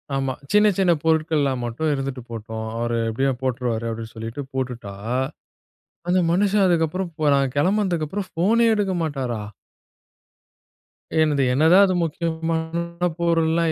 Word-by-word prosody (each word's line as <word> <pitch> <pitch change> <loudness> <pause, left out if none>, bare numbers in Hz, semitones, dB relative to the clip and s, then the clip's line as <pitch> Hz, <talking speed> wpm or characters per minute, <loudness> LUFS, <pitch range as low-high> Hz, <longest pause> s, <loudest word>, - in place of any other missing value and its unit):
ஆமா, 135 -1 -1 0.2
சின்ன 210 +1 +5
சின்ன 185 -3 +3
பொருட்கள்லாம் 155 -5 +1
மட்டும் 150 +7 -1
இருந்துட்டு 135 -2 -3
போட்டும் 110 0 -5
அவரு 120 0 -1
எப்டியும் 130 +2 0
போட்டுருவாரு, 120 -3 -1
அப்டின்னு 115 0 -6
சொல்லிட்டு 115 +5 -5
போட்டுட்டா, 125 -6 -4 1.2
அந்த 185 +1 +3
மனுஷன் 200 +2 +3
அதுக்கப்புறம் 175 +1 0
போ 155 - -1
நான் 135 -2 +1
கெளம்புனதுக்கப்புறம் 185 +1 0
போனே 230 +6 +3
எடுக்க 200 -3 0
மாட்டாரா? 130 -8 -3 1.8
என்னது 145 -3 +2
என்னதான் 165 +8 +6
அது 185 -1 0
முக்கியமான 165 +2 -2
பொருள்லாம் 165 -1 +2
155 Hz, 120 wpm, -23 LUFS, 130-175 Hz, 1.8 s, என்னதான்